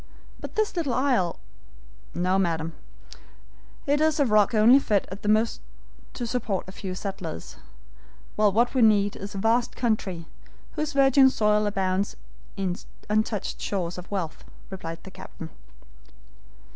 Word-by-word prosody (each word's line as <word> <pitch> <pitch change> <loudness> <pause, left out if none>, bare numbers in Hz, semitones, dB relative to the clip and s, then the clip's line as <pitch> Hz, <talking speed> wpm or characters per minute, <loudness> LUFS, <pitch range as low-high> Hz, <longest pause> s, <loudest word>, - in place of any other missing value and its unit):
But - - -8
this 435 -2 0
little 300 -8 -1
isle 250 -11 +1 0.4
" - - -24
"No, 185 +1 +3
madam, 165 -3 -1 1.1
it 290 +1 +2
is 315 0 +2
a 285 - +4
rock 215 0 +3
only 230 +5 +7
fit 210 -7 0
at 195 - -8
most 220 +2 +2 0.5
to 240 - -3
support 225 -6 -2
a - - -7
few 185 -1 -6
settlers; 185 - -6 0.8
while 210 -1 +4
what 235 +5 +2
we 260 - +2
need 205 -2 +4
is 200 +1 -7
a - - -3
vast 230 +4 +1
country, 200 -8 -1 0.5
whose 305 -2 -3
virgin 270 -1 +6
soil 210 -3 +2
abounds 195 -1 0 0.4
in 190 -2 -1 0.4
untouched 215 -1 -1
stores 180 -3 -2
of 180 - -11
wealth," 180 -6 -4 0.3
replied 165 -3 -7
the 190 - -10
captain. - - -10
210 Hz, 145 wpm, -26 LUFS, 185-240 Hz, 1.1 s, only